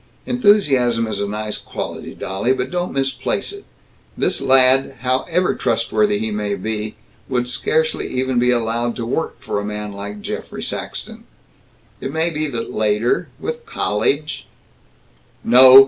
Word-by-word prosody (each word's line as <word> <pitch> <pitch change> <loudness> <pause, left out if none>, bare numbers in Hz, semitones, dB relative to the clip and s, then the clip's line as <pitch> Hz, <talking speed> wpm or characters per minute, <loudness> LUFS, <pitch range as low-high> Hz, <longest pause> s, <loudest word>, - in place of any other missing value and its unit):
Enthusiasm 140 - +3
is 105 -2 -3
a 100 - 0
nice 105 +1 -3
quality, - - -6
dolly, 100 +6 -1
but 130 0 -3
don't 180 0 -1
misplace 135 - -1
it. 405 - -11 0.5
This - - 0
lad, 135 +1 +5
however 160 +8 +1
trustworthy 110 -2 +1
he 110 +1 -2
may 105 -1 -1
be, 105 +2 -3 0.3
would 125 -2 0
scarcely 465 - 0
even 130 -1 0
be 125 +1 +3
allowed 120 0 +1
to 120 - -3
work 125 +1 -2
for 125 - -2
a - - -3
man 105 0 -4
like 100 +1 -7
Geoffrey - - -5
Saxton. - - -5 0.7
It 135 - -4
may 160 +3 0
be 155 -1 -1
that 120 -5 -4
later, 110 +2 +1
with 475 0 -5
college 125 +10 -1 0.5
" - - -34
"No. 130 +2 +10
125 Hz, 145 wpm, -20 LUFS, 105-135 Hz, 0.7 s, No